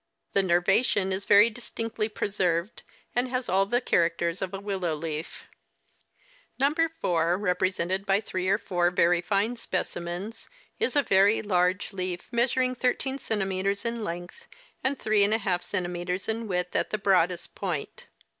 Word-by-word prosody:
The 200 - +4
nervation 190 +2 +2
is 195 +1 -3
very 210 +3 +6
distinctly 225 -1 -4
preserved, 190 -2 -1 0.3
and 245 +1 +3
has 255 0 -2
all 195 +1 +2
the 240 +4 +2
characters 170 -3 +1
of 185 - -2
a 195 - -4
w^illow 190 -6 -3
leaf. 160 0 -5 0.6
" - - -34
Number 310 +5 +2
4, 170 0 +2
represented 185 0 -1
by 195 +1 +4
three 185 -3 -3
or 200 - +4
four 175 -4 0
very 175 0 +3
fine 205 +6 0
specimens, 185 +1 -4 0.3
is 450 -7 +1
a 285 - +4
very 200 +1 +4
large 185 0 +1
leaf, 185 -2 -4
measuring 255 +1 +2
13 255 +2 -1
cm. 195 -1 -1
in 235 -1 -2
length 175 - -7 0.4
and 270 +1 +2
3] 215 -3 +3
cm. 180 -3 -2
in 225 0 -2
width 180 -2 -2
at - - +1
the 215 - -1
broadest 180 -3 +1
point. 175 -8 -5
195 Hz, 145 wpm, -27 LUFS, 180-225 Hz, 0.6 s, very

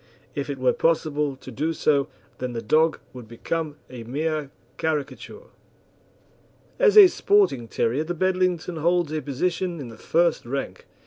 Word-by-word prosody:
If 140 0 -4
it 140 - -3
were 130 -1 +2
possible 150 -3 0
to 130 0 -11
do 155 +7 -1
so, 145 -3 +1 0.3
then 125 -1 -4
the 115 - -4
dog 155 +7 +3 0.2
would 125 -3 -10
become 150 +6 -4
a 125 -2 -9
mere 150 +4 -2 0.3
caricature. 160 - -4 1.3
As 445 -4 +5
a 415 - +12
sporting 380 - +2
terrier 120 +6 0
the 175 +2 -4
Bedlington 185 -1 0
holds 170 0 +1
a 155 -1 -2
position 170 +5 -2
in 130 -4 -7
the 115 - -12
first 170 0 +1
rank. 135 +3 -5
155 Hz, 150 wpm, -24 LUFS, 135-170 Hz, 1.3 s, a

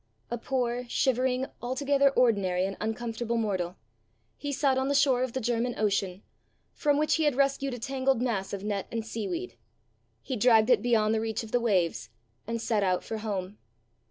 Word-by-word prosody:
A 240 - -1
poor, 245 -1 -1
shivering, 255 +1 +1 0.2
altogether 275 +3 +2
ordinary 200 -8 +2
and 195 0 -3
uncomfortable 230 +1 -2
mortal, 190 -5 -1 0.6
he 285 - -5
sat 275 -1 +2
on 265 +1 0
the 285 - +1
shore 270 -3 +4
of 255 -2 -1
the 260 - -1
German 240 0 -1
Ocean, 195 -2 0 0.5
from 290 -2 +1
which 305 +2 +2
he 320 - +1
had 295 -4 +2
rescued 275 -1 +1
a - - -8
tangled 265 +1 0
mass 225 -6 -1
of 200 -1 -5
net 205 -2 -2
and 225 -1 -3
seaweed! 195 - -4 0.7
He 260 - -3
dragged 225 0 +4
it 230 -5 +5
beyond 220 -2 +2
the 220 - +1
reach 225 0 -2
of 220 - -10
the 245 - +3
waves, 175 - +1 0.4
and 230 0 -2
set 220 -2 0
out 185 -2 +1
for 220 - -5
home. 205 -2 -4
230 Hz, 185 wpm, -28 LUFS, 210-260 Hz, 0.7 s, it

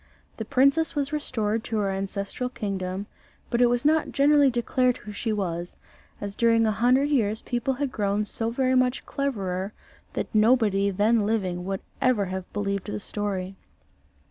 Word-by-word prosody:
The 220 - -4
princess 275 +8 +3
was 285 0 -1
restored 225 -7 -1
to 225 - -2
her 200 -2 0
ancestral 200 +5 -3
kingdom, 195 -4 -4 0.5
but 240 0 +2
it 245 - +7
was 245 +2 0
not 315 +1 +3
generally 285 0 +5
declared 250 +1 +1
who 210 - -9
she 220 +2 -3
was, 175 -4 -3 0.4
as 200 -1 -5
during 230 -1 +3
a 215 - +2
hundred 250 +6 +3
years 220 -6 +1
people 245 +2 -1
had 280 0 -2
grown 205 -1 0
so 225 +2 -2
very 255 +2 +1
much 255 0 +2
cleverer 200 -8 -2 0.4
that - - -4
nobody 215 -3 +3
then 210 +3 +2
living 185 -5 -1
would 195 0 -3 0.2
ever 245 -6 +3
have 185 0 -5
believed 200 -1 -2
the 210 - -3
story. 195 -2 -4
220 Hz, 165 wpm, -26 LUFS, 200-255 Hz, 0.5 s, it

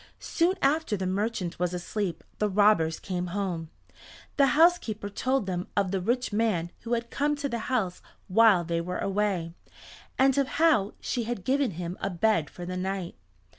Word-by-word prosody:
Soon 355 +3 +1
after 280 -5 +2
the 190 - -3
merchant 190 -2 -2
was 180 0 0
asleep 180 -1 -3 0.2
the 210 - +1
robbers 195 -5 +3
came 180 -2 -3
home. 175 -5 -3 0.7
The 280 -1 +5
housekeeper 310 -12 +3
told 255 +3 0
them 180 -1 -3
of 195 -2 +2
the 195 -2 -1
rich 240 +3 -1
man 205 -6 0
who 235 0 -4
had 235 0 -2
come 295 +1 +1
to 285 -1 -3
the 235 -3 -3
house 215 -9 -1 0.3
while 200 -2 +5
they 170 0 -1
were 180 +2 -4
away, 195 -4 -1 0.6
and 265 0 +4
of 275 - +2
how 300 -11 +3
she 240 -3 -2
had 235 -5 -4
given 275 0 +2
him 175 0 -5
a 195 - -1
bed 180 -3 +1
for 175 - -8
the 185 +1 -4
night. 190 -1 -3
205 Hz, 175 wpm, -27 LUFS, 180-240 Hz, 0.7 s, The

